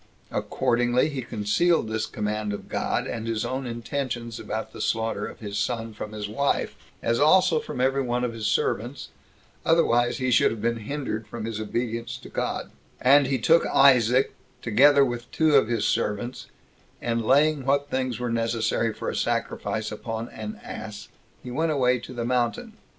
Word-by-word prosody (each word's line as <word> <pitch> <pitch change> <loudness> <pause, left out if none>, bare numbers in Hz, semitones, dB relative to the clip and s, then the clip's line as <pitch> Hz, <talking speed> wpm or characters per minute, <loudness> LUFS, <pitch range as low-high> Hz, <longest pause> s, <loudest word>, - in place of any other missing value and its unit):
Accordingly 120 +2 +1
he 140 -3 -4
concealed 115 +8 +1
this 110 0 -2
command 105 -2 -2
of 100 - -7
God, - - -1
and 115 0 -4
his 115 0 -1
own 130 +1 -3
intentions 120 0 -4
about - - -5
the - - -7
slaughter 115 0 -1
of - - -11
his 100 -1 -3
son, 115 -2 -2
from 105 0 -7
his 105 -1 -4
wife, 140 +7 0 0.3
as 115 0 +1
also 155 +2 +5
from - - -6
every 135 +2 +2
one 125 -1 -1
of 120 -1 -1
his 110 -2 -3
servants, 120 +4 -1 0.5
otherwise 120 -8 +3
he 130 -1 0
should - - +5
have 115 - -5
been 115 +2 0
hindered 135 -6 -3
from 115 -2 -6
his 110 -1 -4
obedience 115 +2 -3
to - - -12
God; - - -3 0.3
and 140 +2 +5
he 135 0 +1
took 165 +8 +4
Isaac, 130 -2 +5 0.3
together 140 +5 +5
with 120 -1 -5
two 160 -1 +2
of 135 -6 +5
his 115 -3 0
servants, 110 +4 -1 0.5
and 115 -1 -1
laying 145 +4 +3
what 140 +2 +1
things 130 -2 -1
were 125 -1 -2
necessary 115 0 0
for - - -7
a - - -2
sacrifice 110 0 -2
upon 115 +2 -5
an 215 +1 -7
ass, 110 - -8 0.3
he 125 - -7
went 160 +5 0
away 125 -3 +2
to 120 - -10
the 120 -2 -4
mountain. 125 - -1
120 Hz, 175 wpm, -25 LUFS, 115-135 Hz, 0.5 s, also